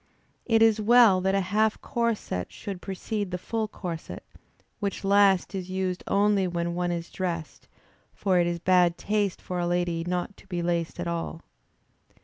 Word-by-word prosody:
It 225 -2 +5
is 220 -1 +4
well 225 -4 +6
that 190 +1 +1
a 195 - +2
half 210 +3 +1
corset 230 - -2
should 195 -4 -7
precede 200 +1 -4
the 180 - -3
full 220 +4 -2
corset, 175 -5 -7 0.6
which 200 -2 -3
last 200 -1 +4
is 185 -2 -5
used 185 -1 -2
only 200 -1 +3
when 170 -1 -2
one 175 0 -1
is 170 -1 -4
dressed; 170 -4 -4 0.4
for 185 -3 +1
it 175 - +2
is 175 0 -1
bad 175 0 +3
taste 205 -2 -1
for 180 -1 -4
a 175 - 0
lady 175 -1 0
not 180 +3 -3
to - - -18
be 175 -2 -3
laced 170 -1 -1
at 175 - -2
all. 165 -1 -4
185 Hz, 170 wpm, -27 LUFS, 175-205 Hz, 0.6 s, well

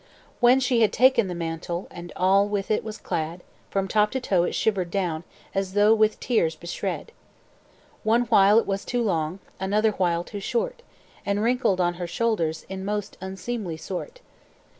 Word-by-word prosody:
"When 245 +2 +6
she 250 -2 +2
had 215 -3 +4
taken 255 -4 +4
the 180 - -4
mantle, 170 +1 -4
And 175 0 -9
all 195 +2 +4
with 205 0 -2
it 215 - +1
was 220 -1 -6
clad, 165 +2 -4 0.3
From 195 -1 -1
top 210 +1 +3
to 260 - 0
toe 190 -8 +1
it - - -3
shivered 190 -5 0
down, 170 -4 -1 0.3
As 195 -1 -2
though 210 +1 +6
with 215 -1 +3
shears 170 -10 +1
beshred. 170 - -4 0.9
"One 230 +2 +3
while 210 -3 +5
it 230 - +4
was 195 0 -2
too 245 -1 -1
long, 165 -4 -1 0.2
Another 210 +3 +2
while 175 -4 0
too 205 - -7
short, 475 - -2 0.4
And 200 +1 0
wrinkled 235 -5 +2
on 175 -1 +2
her 175 - -2
shoulders, 170 -6 -1
In 190 0 -6
most 205 0 -3
unseemly 190 -1 -4
sort. 190 - -6
200 Hz, 175 wpm, -25 LUFS, 175-225 Hz, 0.9 s, When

